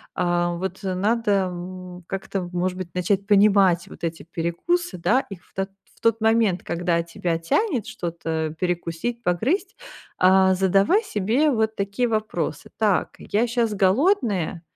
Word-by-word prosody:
а, 175 -1 +1
вот 190 +2 -4
надо, 205 +4 0 0.2
м, 180 0 -8
как-то, 195 -1 -3
может 180 +1 -1
быть, 180 -2 -7
начать 195 +2 0
понимать 195 -4 +4
вот - - -7
эти 165 0 -4
перекусы, 175 - -2
да, 240 +10 +2
их 190 -3 -9
в - - -30
то 195 0 -2 0.3
в - - -23
тот 230 -1 +1
момент, 220 -4 +3
когда 170 0 0
тебя 170 0 -3
тянет 245 - 0
что-то 160 -2 -3
перекусить, 180 +6 -2
погрызть, 270 - 0 0.4
а, 190 +1 +5
задавай 195 - +3
себе 240 - +1
вот 220 -3 0
такие 200 +5 -1
вопросы: 215 -9 -2
"Так, 210 -4 +1
я 225 +4 0
щас 235 -2 0
голодная 200 - +1
190 Hz, 140 wpm, -23 LUFS, 175-220 Hz, 0.4 s, а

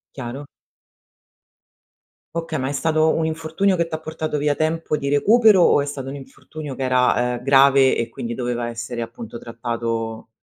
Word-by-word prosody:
Chiaro. 130 +2 -6 1.9
Okay, 165 -3 -3
ma 130 - -2
è - - -3
stato 155 +3 +2
un 160 - 0
infortunio 160 +5 0
che 170 -1 0
t'ha 155 -1 -4
portato 155 -1 -4
via 145 0 +1
tempo 155 0 -1
di 140 -1 -3
recupero 210 +5 +5
o 145 - +4
è - - -2
stato 135 -2 -5
un 140 - -6
infortunio 145 +1 -9
che 135 - -4
era, 125 -1 +2
ehm, - - -11
grave 135 0 +5
e 115 - -1
quindi 115 0 -5
doveva 120 -1 -2
essere, 120 0 -5
appunto, 115 0 -8
trattato 115 -1 -4
140 Hz, 165 wpm, -21 LUFS, 120-155 Hz, 1.9 s, recupero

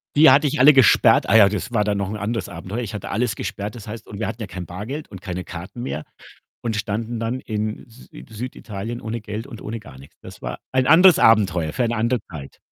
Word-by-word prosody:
Die 155 +2 +8
hatte 145 +1 +5
ich 130 - -2
alle 145 +3 +8
gesperrt. 130 -4 +5
Ah - - +4
ja, 100 -2 +7
das 105 +4 -4
war 105 -3 +2
dann 105 -1 0
noch 100 -1 -2
ein 105 - -4
anderes 105 -1 -3
Abenteuer. 90 +7 -6
Ich 110 -3 -5
hatte 105 - -6
alles 115 +3 -1
gesperrt, 105 0 -5
das 110 -3 -10
heißt 110 +1 -8
und 100 - -9
wir - - -1
hatten 115 - -6
ja 105 - -4
kein 90 -1 -7
Bargeld 110 - -6
und 95 -3 -10
keine 90 -2 -5
Karten 90 +7 -8
mehr 80 -11 -4 0.6
und 115 -2 -2
standen 110 +2 -3
dann 115 +3 -2
in 110 -1 -4
Sü 115 +2 -16
in - - -11
Süditalien 115 -1 -6
ohne 115 +1 -4
Geld 105 +4 -6
und 115 -5 -10
ohne 115 +1 -5
gar 65 -10 -13
nix. 70 - -16
Das - - -12
war - - -5
ein 130 0 +2
anderes 180 +4 +7
Abenteuer, 95 -8 +3
für 125 - 0
eine 120 0 -1
andere 115 +1 +1
Zeit. 75 -5 -9
110 Hz, 245 wpm, -22 LUFS, 100-120 Hz, 0.6 s, Die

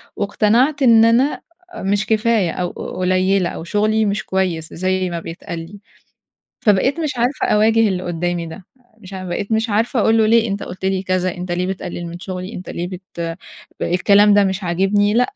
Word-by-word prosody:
واقتنعت 230 +8 +1
إن 225 -3 +6
أنا 245 +5 +2 0.4
مش 200 +2 0
كفاية 220 -4 +1
أو 180 -1 -3 0.3
قليلة 185 0 +2
أو - - -7
شغلي 215 +4 +1
مش 200 -1 -1
كويس 180 -4 -2
زي 185 +1 -1
ما 170 -1 -4
بيتقال 165 0 -7
لي، 175 +5 -10 0.8
فبقيت 225 - +2
مش 310 -3 -1
عارفة 245 +3 0
أواجه 220 +2 +3
اللي 185 -2 -2
قدامي 175 -1 -2
ده. 165 +3 -10 0.3
مش 195 -2 -13
عا 185 -1 -6
بقيت 185 +4 -4
مش 220 +1 +1
عارفة 230 +4 +1
أقول 225 +2 +3
له 220 - +4
ليه 230 +1 +3
أنت 200 0 -3
قلت 185 +1 -8
لي 190 0 0
كذا؟ 185 -1 -1
أنت 180 0 -5
ليه 180 +1 -1
بتقلل 180 -2 -5
من 170 +1 -7
شغلي؟ 185 +2 -6
أنت 185 - -8
ليه 175 +1 -4
بت 175 -3 -6 0.5
الكلام 200 +3 +4
ده 205 0 +5
مش 190 0 -2
عاجبني، 195 +4 +1
لأ 240 - +4
195 Hz, 185 wpm, -19 LUFS, 180-215 Hz, 0.8 s, إن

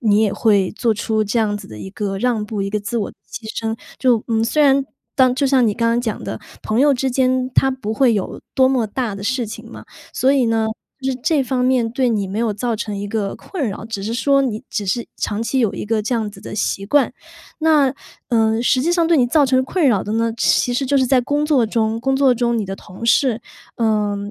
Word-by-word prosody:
你 210 - +4
也 210 -3 +1
会 200 -5 +2
做 230 -2 +2
出 215 +1 0
这 215 +4 -1
样 210 -2 +1
子 - - -9
的 110 - -11
一 190 - -8
个 195 -1 -3
让 235 -2 0
步， 210 -1 -3
一 195 - -3
个 210 - 0
自 205 +4 -4
我 210 - -2
牺 - - -27 0.5
牲。 225 0 -2 0.2
就， 245 -4 +3
嗯， 225 -1 +1
虽 300 +6 +2
然 275 -1 +4 0.3
当 255 -2 +4
就 280 - 0
像 260 -3 +3
你 210 - +1
刚 230 -1 +1
刚 235 +1 +2
讲 225 -4 -3
的， - - -5 0.2
朋 215 +1 -1
友 290 0 +5
之 265 +1 -1
间， 255 0 +1
它 270 - +4
不 255 -5 -4
会 240 0 +3
有 200 -3 -3
多 260 -1 +4
么 250 -4 +1
大 225 -1 -3
的 200 - -7
事 255 +1 0
情 220 +2 -9
嘛， - - -11 0.3
所 265 - +2
以 270 -3 +3
呢， 225 -1 +1 0.4
就 265 - 0
是 255 - -6
这 295 -2 +2
方 255 -1 -1
面 250 -3 +2
对 255 +2 +1
你 205 -3 0
没 200 +3 -4
有 230 -2 +1
造 230 +3 -2
成 210 -1 -4
一 200 +1 -4
个 200 -2 -2
困 295 - -4
扰， 200 - -6
只 225 -3 -5
是 220 +3 -3
说 275 +3 +2
你 235 -2 -2
只 205 -2 -3
是 235 +5 -1
长 210 +2 -2
期 265 +3 -1
有 225 -5 +1
一 - - -5
个 220 -1 0
这 220 +4 -1
样 220 -3 -1
子 195 - -14
的 - - -8
习 195 -1 -1
惯。 275 -1 +2 0.5
那， 300 -4 +3 0.3
呃， 225 -2 +2
实 255 +1 +2
际 340 +4 +1
上 340 -2 +2
对 335 - +4
你 250 -4 +4
造 290 +4 +3
成 260 0 +3
困 315 +3 +1
扰 205 -6 +2
的 210 - -4
呢， 230 0 0
其 245 - +2
实 270 - 0
就 280 - +2
是 260 - +2
在 260 0 +4
工 290 +4 0
作 285 -6 +3
中。 220 0 0
工 270 +2 +1
作 270 -2 +4
中 235 0 0
你 215 - -1
的 195 0 -5
同 190 +4 -11
事， 245 -1 +3 0.4
呃， 210 -3 +1
235 Hz, 270 characters per minute, -19 LUFS, 215-260 Hz, 0.5 s, 友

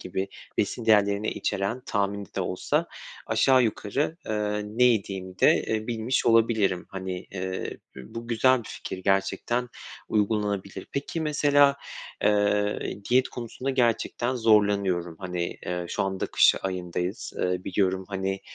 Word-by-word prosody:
gibi 95 +1 -3 0.3
besin 115 -2 -1
değerlerini 105 -1 +3
içeren 100 +5 -2
tahmini 100 -2 -2
de - - +1
olsa - - 0 0.4
aşağı 130 -1 +4
yukarı, 120 +8 -1
eee, 105 -1 -1
ne 110 +4 +1
yediğimi 95 -5 0
de, - - +6
eee, 110 0 -1
bilmiş 120 +2 -1
olabilirim. 110 -5 +3
Hani, 95 -1 -5
eee, 95 -1 -4 0.2
bü 65 -1 -11
bu 115 0 -6
güzel 130 +3 +4
bir 115 - -9
fikir 95 - -6
gerçekten, 100 +6 0 0.4
uygulanabilir. 100 -2 -1
Peki, 145 +4 -3
mesela, 145 -2 +4 0.5
eee, 105 0 +2 0.3
diyet 130 +1 +4
konusunda 125 +2 -5
gerçekten 120 0 +1
zorlanıyorum. 100 -7 +2
Hani, 90 -2 -4
eee, 90 0 -2
şu - - -1
anda 95 -1 -2
kış - - +5
ayındayız, 90 +2 -3
eee, 90 0 -1
biliyorum, 95 0 0
hani, 95 -1 -2
105 Hz, 135 wpm, -26 LUFS, 95-115 Hz, 0.5 s, de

